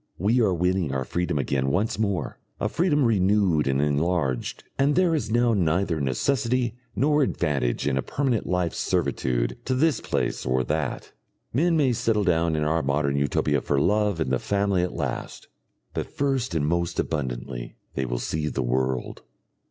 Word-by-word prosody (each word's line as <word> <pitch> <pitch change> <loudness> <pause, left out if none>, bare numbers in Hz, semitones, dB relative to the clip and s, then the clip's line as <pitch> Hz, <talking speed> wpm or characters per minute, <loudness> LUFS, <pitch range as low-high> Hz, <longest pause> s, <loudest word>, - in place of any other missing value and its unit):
We 110 +7 +2
are 105 - +3
winning 90 -2 0
our 65 -1 -1
freedom 85 +2 -1
again 70 -1 0
once 100 +7 0
more, 100 -5 -1 0.2
a - - 0
freedom 150 -5 +2
renewed 95 - +3
and 65 0 +1
enlarged, 75 -2 0 0.2
and 140 +2 +3
there 180 -2 +3
is 120 -10 -1
now 120 +1 +3
neither 85 -3 +1
necessity 120 - 0 0.2
nor 150 +2 +3
advantage 75 - 0
in 65 -2 +1
a - - +1
permanent 130 - -1
life 90 -2 0
servitude - - -1
to 130 - 0
this 145 -2 +2
place - - -1
or 65 +1 +1
that. - - -3 0.4
Men 165 +6 +3
may 135 -5 +3
settle 110 -2 +1
down 85 -3 +2
in 75 - 0
our 80 +2 +1
Modern 70 0 0
Utopia 70 0 +1
for 70 - 0
love 105 +2 +2
and 75 -5 -1
the 65 - +2
family 100 -2 +1
at 90 - -2
last, - - -4 0.5
but - - -3
first 135 -8 -1
and 75 -2 +1
most 85 +2 -1
abundantly 65 -4 -3 0.2
they 65 - -1
will - - -2
see 75 +5 -2
the - - -2
world. 65 +1 -1
85 Hz, 170 wpm, -25 LUFS, 70-115 Hz, 0.5 s, are